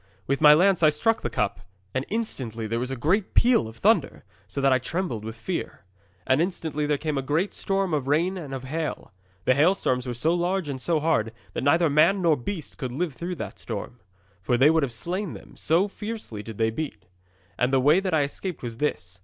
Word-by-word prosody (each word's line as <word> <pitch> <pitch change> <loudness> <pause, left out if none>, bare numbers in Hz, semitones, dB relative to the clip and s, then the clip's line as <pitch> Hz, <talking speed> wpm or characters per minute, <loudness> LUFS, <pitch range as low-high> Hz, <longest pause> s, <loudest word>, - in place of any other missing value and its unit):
'With 140 +2 -1
my 150 -1 +9
lance 185 +2 +4
I 155 - +7
struck 225 +9 +1
the - - -2
cup, 105 -1 -1 0.3
and 130 +1 -1
instantly 130 - -3
there 115 +2 -1
was 125 +1 -3
a 135 - -3
great 175 - 0
peal 235 - +4
of 110 +1 -11
thunder, - - +2 0.2
so - - -5
that 135 -1 +4
I 130 - +3
trembled 130 - -3
for 110 - -4
fear. 115 - -5 0.4
And 130 +4 +3
instantly 160 -4 -2
there 150 -1 +1
came 150 -1 -2
a - - -1
great 150 +9 0
storm 195 -3 -1
of 140 -3 -1
rain 165 +7 +2
and 160 -7 -7
of 135 -1 -5
hail. 155 - -4 0.3
The 130 - +5
hailstones 140 -4 +2
were 120 - -3
so 155 +8 +2
large 175 0 0
and 130 -2 -4
so 165 +1 +1
hard 150 -8 +1 0.2
that - - -3
neither 165 +4 +4
man 155 +7 +4
nor 170 -4 +3
beast 155 +5 -6
could 130 -2 -3
live 160 +4 -2
through 175 +5 -5
that - - -7
storm, - - -6 0.4
for 120 +5 +1
they 140 +5 +6
would 160 0 +3
have 140 -4 -1
slain 175 - -3
them, - - -12
so 170 +6 +2
fiercely 210 - -6
did 110 0 -9
they 110 0 +2
beat. 110 -7 -5 0.5
And 125 +1 +2
the 135 - +4
way 150 +7 +5
that 190 -1 -2
I 150 - +3
escaped 170 +5 -5
was 115 -2 -5
this. 90 -11 -2
150 Hz, 220 wpm, -25 LUFS, 125-175 Hz, 0.5 s, my